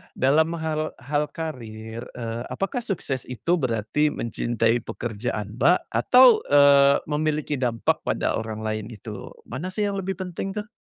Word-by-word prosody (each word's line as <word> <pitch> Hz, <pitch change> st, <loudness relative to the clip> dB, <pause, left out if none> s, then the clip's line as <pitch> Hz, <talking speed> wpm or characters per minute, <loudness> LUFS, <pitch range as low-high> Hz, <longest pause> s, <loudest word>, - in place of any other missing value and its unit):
dalam 155 Hz, +5 st, +3 dB
hal 155 Hz, -1 st, -2 dB
hal 145 Hz, +2 st, 0 dB
karir, 115 Hz, -8 st, -6 dB, 0.2 s
eee, 115 Hz, -1 st, -4 dB
apakah 195 Hz, +6 st, -2 dB
sukses 170 Hz, -, -4 dB
itu 125 Hz, +7 st, -3 dB
berarti 120 Hz, +4 st, 0 dB
mencintai 115 Hz, -3 st, 0 dB
pekerjaan, 110 Hz, -1 st, -5 dB
Mbak, 180 Hz, +2 st, +3 dB
atau, 250 Hz, -2 st, +6 dB
eee, 140 Hz, -1 st, +6 dB
memiliki 150 Hz, -1 st, -1 dB
dampak 120 Hz, -3 st, 0 dB
pada -, -, 0 dB
orang 110 Hz, -1 st, -5 dB
lain 110 Hz, -1 st, -3 dB
itu? 110 Hz, -5 st, -8 dB, 0.2 s
Mana 170 Hz, +7 st, -6 dB
sih 185 Hz, +3 st, -2 dB
yang 200 Hz, -1 st, -1 dB
lebih 190 Hz, 0 st, -3 dB
penting, 185 Hz, +1 st, -5 dB
tuh? 210 Hz, 0 st, -4 dB
140 Hz, 145 wpm, -24 LUFS, 115-165 Hz, 0.2 s, atau